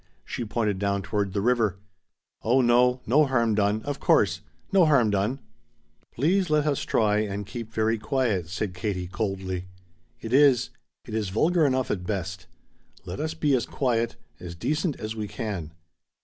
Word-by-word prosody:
She - - -4
pointed 105 -3 -1
down 100 0 0
toward 100 -1 -2
the 100 - 0
river. 115 -6 +2 0.6
"Oh 125 +4 +3
no, 125 +1 +3
no 145 +6 +4
harm 120 -4 +2
done, 105 +1 +1
of 145 -1 -4
course - - +3 0.3
No 185 -4 +5
harm 125 -8 +4
done 105 +7 0 0.4
" - - -41
"Please 180 +8 +2
let 150 -1 +2
us 145 -3 0
try 105 -1 +2
and 100 -1 -3
keep 115 +2 -7
very 110 0 0
quiet," 110 - 0
said 90 +2 -3
Katie 90 -1 -3
coldly. 95 -2 -3 0.5
"It 115 +1 -6
is 135 -3 +5 0.3
it 110 - -9
is 110 -3 -1
vulgar 160 - +3
enough 130 -1 0
at 90 -3 -3
best. 95 -4 -4 0.6
Let 90 +1 -6
us 160 +1 -2
be 150 -3 +1
as 125 -3 +1
quiet 120 -4 0 0.2
as 85 -1 -8
decent 150 - -1
as 110 +1 -4
we 105 -2 -4
can." 100 -10 -5
110 Hz, 170 wpm, -26 LUFS, 100-130 Hz, 0.6 s, No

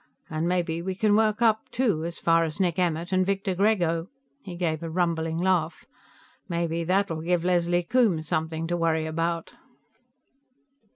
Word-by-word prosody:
And 155 +2 -1
maybe 170 -2 0
we 190 +1 -3
can 205 +1 +2
work 215 +1 +2
up, 220 -1 +2
too, 215 -11 0
as 170 0 -5
far 165 0 +3
as 160 +2 -4
Nick 180 -2 +1
Emmert 170 0 -1
and 185 0 +3
Victor 195 0 -1
Grego." 180 -4 +1 0.4
He 180 -3 -7
gave 165 -3 -1
a 165 - -5
rumbling 165 -1 -1
laugh. 175 -2 0 0.6
"Maybe 170 -1 -1
that'll 180 -2 0
give 175 +1 0
Leslie 175 -1 +2
Coombes 180 -7 +1
something 160 +1 -2
to 175 +1 -1
worry 165 -2 +1
about." 165 +1 -2
170 Hz, 160 wpm, -26 LUFS, 165-185 Hz, 0.6 s, far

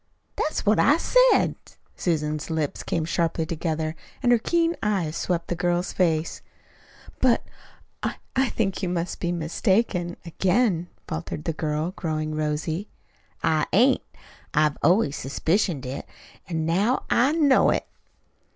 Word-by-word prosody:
"That's 310 - -2
what 210 +1 +4
I 295 - +5
said." - - +4 0.4
Susan's 155 -3 -1
lips 160 -3 -2
came 160 - -1
sharply 165 -1 0
together 160 -1 -2 0.3
and 245 - +4
her 240 - +5
keen 335 +6 +1
eyes 190 -7 0
swept 170 -2 -1
the - - -1
girl's 175 +1 0
face. 165 -3 0 0.8
"But, 255 -2 +3 0.6
I - - -2 0.2
I 265 -1 +2
think 195 -4 -1
you 185 - -1
must 175 0 -2
be 175 - -1
mistaken 175 +2 0
again," 180 +1 +1 0.2
faltered 80 - -5
the 165 - -1
girl, 155 +2 -2
growing 155 -4 -3
rosy. 155 +5 -2 0.5
"I 155 -1 +2
ain't. 255 +6 +5 0.5
I've 150 -1 +3
always 170 -2 +3
suspicioned 160 +2 0
it, 130 +2 -5 0.4
an' 160 -2 -1
now 200 +10 +1
I 265 +5 +4
know 295 -5 +4
it." - - 0
175 Hz, 135 wpm, -25 LUFS, 155-210 Hz, 0.8 s, I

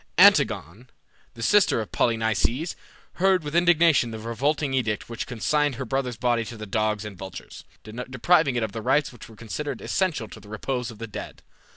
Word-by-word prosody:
Antigone, 100 - +4 0.5
the 115 - -6
sister 205 - +4
of 110 - -5
Polynices, 115 - 0 0.5
heard 190 -3 +4
with 145 0 -5
indignation 170 -6 +4
the 110 - -6
revolting 135 +6 -1
edict 110 -5 -1
which 115 - -5
consigned 145 +4 0
her 130 +2 -5
brother's 125 -1 -2
body 120 -1 +1
to 115 +1 -8
the 110 - -6
dogs 105 0 -1
and 105 -2 -7
vultures, 95 +1 -9 0.2
depriving 125 +6 +1
it 120 - 0
of 110 - -2
those 110 - -5
rites 140 +2 +2
which 120 - -12
were 110 - -14
considered 115 +7 -5
essential 170 - -1
to 110 - -11
the 105 0 -15
repose 125 +3 -3
of 115 - -10
the 115 - -5
dead. 105 - -8
120 Hz, 185 wpm, -25 LUFS, 110-145 Hz, 0.5 s, Antigone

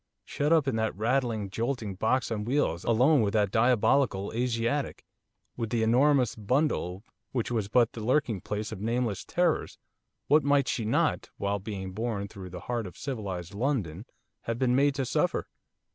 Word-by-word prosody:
shut 145 +2 -1
up 160 -4 +4
in 135 - +1
that 110 -3 -1
rattling, 115 -2 0
jolting 115 0 -3
box 115 +7 0
on 105 -2 -2
wheels, 115 - 0
alone 125 +5 +4
with 100 -2 0
that 105 -3 +2
diabolical 115 -2 +2
Asiatic, 120 +3 -1 0.5
with 115 -2 -3
the 115 -1 +1
enormous 130 +2 +3
bundle, 110 - 0 0.3
which 120 -2 -1
was 110 -4 0
but 115 +2 +3
the 110 - -6
lurking 120 -5 +1
place 105 +1 -4
of 105 -3 -7
nameless 115 -2 -1
terrors, 175 -2 0 0.5
what 150 +1 +4
might 140 -1 +3
she 115 - -1
not, 110 - +1
while 100 0 -1
being 95 -1 -5
borne 105 -1 -3
through 95 -3 -9
the 90 0 -8
heart 120 -4 -3
of 90 - -12
civilised 100 - -5
London, 105 - -2 0.4
have 115 0 -2
been 125 -1 +2
made 140 +1 +3
to 135 -2 -1
suffer? - - 0
115 Hz, 170 wpm, -28 LUFS, 100-130 Hz, 0.5 s, up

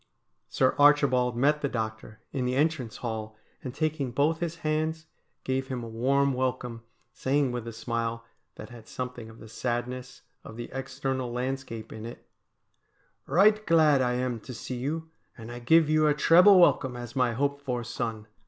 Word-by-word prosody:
Sir - - +2
Archibald 135 -4 +4
met 150 +4 +2
the 140 - 0
doctor 110 -1 -5
in 130 -3 -1
the 125 +1 0
entrance 145 -5 0
hall, 110 -1 -4 0.3
and, 130 - -4
taking 150 -1 -1
both 145 +6 +1
his 170 -1 -3
hands, 155 +1 -1 0.4
gave 130 0 -1
him 125 -2 -4
a - - -6
warm 135 +5 +1
welcome, 125 -2 -2 0.3
saying 135 0 0
with 120 -2 -5
a - - -4
smile 115 0 -3 0.3
that - - -10
had 115 -2 -12
something 125 -3 -6
of 110 - -14
the 110 - -12
sadness 125 +2 -4 0.2
of 110 - -11
the 120 - -7
external 135 -1 -3
landscape 125 -3 -4
in 110 +1 -7
it: 120 - -11 0.5
' - - -25
Eight 215 +1 +5
glad 155 -4 +5
I 125 -1 +1
am 125 -1 -2
to 125 +3 -9
see 125 +2 -5
you, 160 +5 -4 0.3
and 115 0 -9
I 120 - -7
give 160 +6 +4
you 155 0 +3
a 150 - +3
treble 180 +6 +7
welcome 130 -7 +3
as 120 -2 -8
my 125 -3 +2
hoped 140 +3 -1
for 125 -4 -3
son. 115 -2 -4
130 Hz, 180 wpm, -27 LUFS, 120-145 Hz, 0.5 s, treble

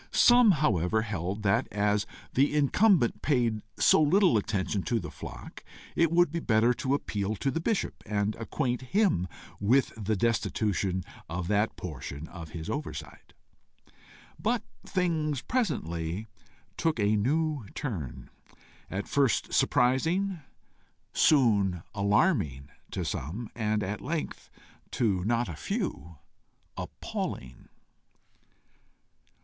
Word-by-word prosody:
Some 240 -4 +6
however 110 - +1
held 100 -1 -3
that, 100 -1 +2
as 105 0 +1 0.3
the 140 +3 +3
incumbent 150 - +3
paid 120 -7 +1 0.2
so 105 +8 +5
little 175 - +4
attention 100 -2 0
to 115 +4 0
his 90 - -7
flock, - - -9 0.3
it 165 -1 +3
would 175 -2 +4
be 170 - -1
better 115 -3 +3
to 130 +3 0
appeal 105 -6 -2
to 135 +7 -1
the 165 - -1
bishop, 220 +3 -1
and 105 0 0
acquaint 125 +2 -2
him 165 - +1 0.3
with 125 +7 +3
the 110 -1 -1
destitution 100 -4 0 0.3
of 85 +1 -3
that 105 +1 +1
portion 75 -2 -7
of 85 -4 -9
his 80 -1 -7
oversight. 145 - -6 1.1
But 225 +1 0 0.2
things 160 -7 -1
presently 90 - -2 0.5
took 160 -7 0
a 105 +1 +3
new 145 +2 0
turn, 75 - -5 0.6
at 100 +2 -4
first 140 -5 +1
surprising, 165 +10 +2 0.7
soon 100 - +3
alarming 100 - +1 0.2
to - - -3
some, 100 - -4
and 110 -2 0
at 100 +3 -4
length, 160 +3 -4 0.4
to 100 -7 +1
not 120 +1 +1
a 85 - -5
few, 80 +3 -4 0.6
appalling. 65 0 -6
110 Hz, 115 wpm, -29 LUFS, 95-150 Hz, 1.1 s, Some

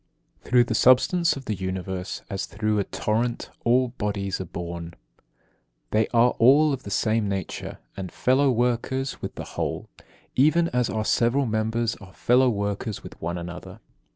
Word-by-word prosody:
19. - - -12
Through 125 -1 +6
the 120 - -3
substance 130 +9 +4
of 135 -1 -8
the 110 - -1
Universe, 95 0 -4
as 95 -2 -4
through 105 +1 -1
a - - +2
torrent, 115 +3 -2
all 125 +2 +3
bodies 100 -5 -3
are - - -4
borne. 85 0 -6 1.0
They 110 +1 +2
are 120 +1 +4
all 140 +6 +6
of 130 - -4
the - - -8
same 110 +1 +1
nature, 95 -1 -4 0.2
and 95 -3 -6
fellow 135 +2 +2
workers 125 +2 -1
with - - -5
the - - -5
whole, - - -4 0.5
even 165 +5 +4
as 125 -1 0
our 110 -1 -2
several 120 +6 +2
members 110 +1 0
are 100 -3 -14
fellow 125 +5 +3
workers 100 -1 -3
with - - -12
one 85 +2 -2
another. 85 +1 -8
110 Hz, 165 wpm, -25 LUFS, 100-125 Hz, 1.0 s, Through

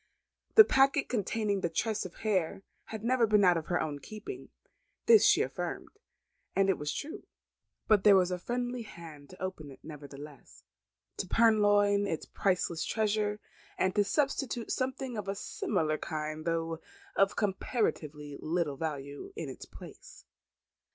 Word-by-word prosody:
The 440 - +12
packet 275 -5 +3
containing 210 -3 -1
the 170 - 0
tress 215 +5 -1
of 180 - -8
hair 195 -3 0 0.2
had 220 -1 -7
never 240 -1 +3
been 210 -1 +4
out 180 -2 +6
of 160 -2 -3
her 175 - +1
own 145 -2 -3
keeping. 215 - -8 0.6
This 455 -2 +7
she - - +5
affirmed; - - -5 0.7
and 195 0 +4
it - - -3
was 150 0 -2
true. 295 - -6 0.6
But 210 -3 +4
there 205 -2 +8
was 185 -1 +3
a 180 - -2
friendly 245 +4 -3
hand 160 -9 -11
to 185 - -14
open 185 -6 -5
it 135 - -13
nevertheless; 145 -2 -11 0.5
to 190 - -3
purloin 205 -2 +4
its 160 -5 -3
priceless 180 -4 0
treasure; 210 -1 0 0.4
and 185 0 +1
to 205 - +3
substitute 270 -1 -1
something 260 -2 -2
of 205 -2 -4
a 195 - -2
similar 160 -6 -1
kind, 155 0 -4
though 165 -1 -1 0.4
of 195 0 +3
comparatively 155 - -2
little 160 -3 -1
value 145 - -5
in - - -5
its - - -9
place. - - -13
195 Hz, 150 wpm, -31 LUFS, 160-220 Hz, 0.7 s, The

